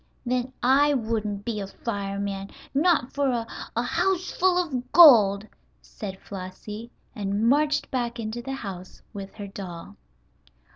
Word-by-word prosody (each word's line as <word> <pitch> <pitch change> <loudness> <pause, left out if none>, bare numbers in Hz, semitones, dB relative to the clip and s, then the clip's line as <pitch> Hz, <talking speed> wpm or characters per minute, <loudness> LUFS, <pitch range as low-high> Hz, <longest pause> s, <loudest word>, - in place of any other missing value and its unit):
"Then 250 +1 -1
I 280 +3 +5
wouldn't 220 -4 -2
be 225 -3 -2
a 195 - -4
fireman, 200 -2 -4 0.2
not 295 -3 +2
for 280 -1 +1
a 235 -2 -1 0.3
a 235 - +1
house 360 +8 0
full 370 0 +2
of 260 -8 -2
gold!" 215 - +8 0.3
said - - -8
Flossie, 205 +4 -8 0.2
and 205 +1 -1
marched 295 +2 +2
back 240 -2 -2
into 225 +1 -4
the 270 +2 -5
house 190 -8 -8
with 195 -2 -8
her 205 -2 -6
doll. 190 -4 -8
230 Hz, 140 wpm, -26 LUFS, 200-270 Hz, 0.3 s, gold